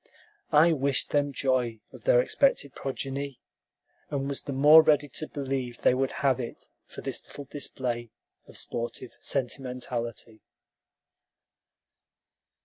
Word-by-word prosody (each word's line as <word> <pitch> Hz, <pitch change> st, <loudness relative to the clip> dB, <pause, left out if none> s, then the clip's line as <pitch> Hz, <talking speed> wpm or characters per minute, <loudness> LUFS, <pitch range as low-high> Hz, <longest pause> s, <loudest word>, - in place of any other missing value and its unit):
I 155 Hz, +2 st, +6 dB
wished 140 Hz, -2 st, 0 dB
them 145 Hz, -1 st, +2 dB
joy 130 Hz, -4 st, 0 dB
of -, -, -13 dB
their -, -, +6 dB
expected 270 Hz, -, +1 dB
progeny, 135 Hz, 0 st, -4 dB, 0.7 s
and 140 Hz, -1 st, -2 dB
was 140 Hz, -1 st, -2 dB
the 140 Hz, -, -6 dB
more 150 Hz, +4 st, +8 dB
ready 150 Hz, -2 st, +3 dB
to 155 Hz, +4 st, -5 dB
believe 135 Hz, -4 st, -3 dB
they -, -, +5 dB
would 130 Hz, +1 st, 0 dB
have 130 Hz, -2 st, +3 dB
it 120 Hz, -2 st, -7 dB, 0.2 s
for -, -, -9 dB
this -, -, -4 dB
little 145 Hz, -, -9 dB
display 125 Hz, -4 st, -3 dB, 0.4 s
of -, -, -8 dB
sportive 120 Hz, +1 st, -2 dB
sentimentality. 120 Hz, -3 st, -3 dB
135 Hz, 125 wpm, -28 LUFS, 125-145 Hz, 0.7 s, more